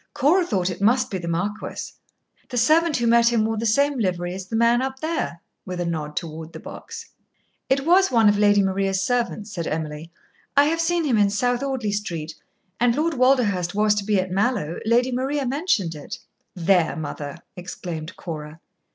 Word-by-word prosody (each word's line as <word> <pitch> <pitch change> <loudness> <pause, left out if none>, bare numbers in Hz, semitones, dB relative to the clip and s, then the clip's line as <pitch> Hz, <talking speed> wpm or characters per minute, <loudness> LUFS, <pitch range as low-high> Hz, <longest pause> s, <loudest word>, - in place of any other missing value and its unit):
"Cora 340 +8 +4
thought 190 - -1
it 180 - -8
must 245 +5 +3
be 190 - -2
the 170 - -6
marquis. 180 +6 -3 0.6
The 245 - -4
servant 310 +6 +3
who 240 - 0
met 235 0 +5
him 225 -2 +2
wore 225 0 -1
the 230 +2 -1
same 280 +4 +2
livery 180 -4 -1
as 190 0 -7
the 225 - -4
man 235 +2 +4
up 265 0 -3
there" 315 - -3 0.2
with 180 -1 -6
a 175 - -1
nod 155 -3 -3
toward 160 0 -5
the - - -8
box. - - -9 0.6
"It 270 +1 +1
was 375 +3 +5
one 225 -3 +4
of 205 - +5
Lady 205 -1 +5
Maria's 195 0 0
servants," 230 -1 -1
said 170 -3 -3
Emily; 155 +1 -4 0.5
"I 285 - +8
have 330 +2 +1
seen 340 0 +1
him 240 -7 +2
in 205 -1 +4
South 245 +4 0
Audley 265 -6 -2
Street. 170 -7 -4 0.5
And 240 0 +3
Lord 320 +2 0
Walderhurst 235 - +2
was 210 0 +3
to 210 -1 -2
be 205 -1 +1
at 185 0 -2
Mallowe. 195 -5 0
Lady 245 +3 +3
Maria 270 +3 -1
mentioned 255 - 0
it." 150 -2 -8 0.4
"There, 180 -1 +2
mother!" 145 -1 -6 0.2
exclaimed 175 -3 -7
Cora. 155 -2 -7
210 Hz, 190 wpm, -23 LUFS, 175-255 Hz, 0.6 s, I